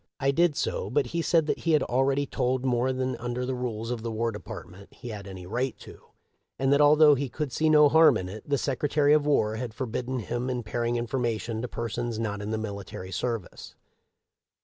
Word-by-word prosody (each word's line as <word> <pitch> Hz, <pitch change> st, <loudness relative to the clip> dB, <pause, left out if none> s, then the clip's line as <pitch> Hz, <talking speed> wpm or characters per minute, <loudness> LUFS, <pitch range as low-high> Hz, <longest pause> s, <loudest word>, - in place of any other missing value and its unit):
I 135 Hz, +1 st, +2 dB
did 165 Hz, +1 st, +2 dB
so, -, -, -2 dB
but 140 Hz, +2 st, +1 dB
he 170 Hz, +7 st, -2 dB
said 165 Hz, -1 st, +3 dB
that -, -, -1 dB
he 165 Hz, -, +1 dB
had 150 Hz, -, +4 dB
already 135 Hz, +3 st, +1 dB
told 130 Hz, -1 st, -1 dB
more 125 Hz, 0 st, +1 dB
than 130 Hz, 0 st, -2 dB
under 120 Hz, +1 st, -3 dB
the 130 Hz, -, -2 dB
rules 120 Hz, -2 st, -4 dB
of 120 Hz, -2 st, -3 dB
the 115 Hz, -, -4 dB
War 115 Hz, +1 st, -1 dB
Depart 105 Hz, -, -8 dB
ment 90 Hz, +3 st, -15 dB
he 120 Hz, -, -10 dB
had 105 Hz, -3 st, -7 dB
any 95 Hz, -2 st, -8 dB
right 125 Hz, +7 st, -2 dB
to, -, -, -13 dB, 0.6 s
and 135 Hz, +1 st, +2 dB
that, 140 Hz, -, +4 dB
although 150 Hz, +1 st, +7 dB
he 140 Hz, -1 st, -1 dB
could 150 Hz, +1 st, -4 dB
see 155 Hz, +5 st, +1 dB
no 150 Hz, -1 st, +7 dB
harm 155 Hz, -4 st, +6 dB
in 90 Hz, -, -5 dB
it, 105 Hz, +7 st, -9 dB
the 140 Hz, -, +2 dB
Secretary 145 Hz, +2 st, +2 dB
of 150 Hz, -1 st, +3 dB
War 110 Hz, -7 st, +2 dB
had 120 Hz, -2 st, -5 dB
forbidden 125 Hz, +1 st, -3 dB
his 115 Hz, -, -7 dB, 0.2 s
imparting 120 Hz, -1 st, -2 dB
information 120 Hz, -2 st, -2 dB
to 125 Hz, -, -3 dB
persons 115 Hz, 0 st, -3 dB
not 105 Hz, -2 st, -3 dB
in 105 Hz, -, -5 dB
the 110 Hz, -, -1 dB
mili 100 Hz, -2 st, -5 dB
tary 95 Hz, 0 st, -8 dB
service. 115 Hz, 0 st, -4 dB
125 Hz, 215 wpm, -27 LUFS, 110-140 Hz, 0.6 s, although